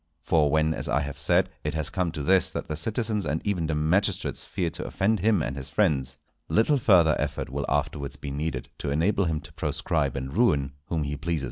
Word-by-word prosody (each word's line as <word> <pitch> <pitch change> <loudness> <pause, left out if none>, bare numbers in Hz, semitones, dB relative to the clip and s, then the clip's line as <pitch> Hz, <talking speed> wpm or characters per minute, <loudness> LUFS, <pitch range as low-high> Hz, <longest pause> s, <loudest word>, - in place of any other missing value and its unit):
For 75 -3 +3
when, 80 +2 +2
as - - -4
I 75 - +2
have 70 0 -5
said, 70 - +3
it 75 +1 -2
has 80 -1 -1
come 90 -3 0
to 75 -3 -4
this 95 +4 +4
that - - -5
the 75 - -3
citizens 105 +5 -1
and 80 -2 -1
even 90 -6 0
the 80 - -1
magistrates 90 +6 +1
fear 85 -3 -2
to - - -5
offend 105 +2 +1
him 100 -3 +2
and 65 - -3
his 65 -1 -5
friends, 70 -9 +1 0.3
little 135 +6 +3
further 85 -9 +5
effort - - -3
will 70 +1 -3
afterwards 70 -1 -1
be 70 - -7
needed 70 -2 -3
to 70 - -3
enable 90 +7 +2
him 80 -2 0
to - - -13
proscribe 70 -5 -1
and 65 +2 -5
ruin 75 - +2
whom 80 -1 -1
he 75 0 -3
pleases. 80 +2 -2
80 Hz, 220 wpm, -26 LUFS, 70-95 Hz, 0.3 s, further